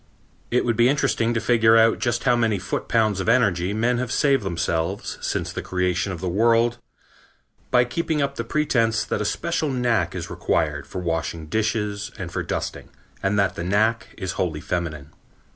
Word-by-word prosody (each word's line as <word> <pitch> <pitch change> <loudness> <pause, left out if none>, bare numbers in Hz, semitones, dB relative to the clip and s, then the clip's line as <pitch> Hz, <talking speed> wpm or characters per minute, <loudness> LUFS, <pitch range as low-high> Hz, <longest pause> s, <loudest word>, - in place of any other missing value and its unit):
It 125 - +1
would 115 -1 +1
be 120 +1 +5
interesting 125 -5 +1
to - - +2
figure 115 -1 +4
out 115 0 +4
just 120 -1 -1
how 125 -2 +4
many 115 -3 +1
foot 90 - -4
pounds 110 -4 +2
of 95 - -1
energy 100 -7 +2
men 115 +3 +1
have 125 -2 -3
saved 140 -2 +3
themselves, 85 0 -2
since - - -2
the - - -4
creation 90 +1 -1
of 90 - -6
the 95 - -2
world, 115 +5 +2 0.9
by 125 -1 +4
keeping 160 +4 -1
up 140 -1 0
the 115 - -4
pretense 115 -5 +1
that - - -2
a - - -1
special 155 - -1
knack 125 -3 0
is - - -4
required - - -1
for 90 - -5
washing 80 -1 -2
dishes 105 +2 -1
and 90 -4 -6
for - - -2
dusting, - - -4 0.3
and 100 +1 0
that 100 -3 +2
the 85 - -5
knack 110 +5 +1
is 95 -3 -3
wholly 80 -5 -1
feminine. 75 -4 -4
110 Hz, 185 wpm, -23 LUFS, 90-120 Hz, 0.9 s, be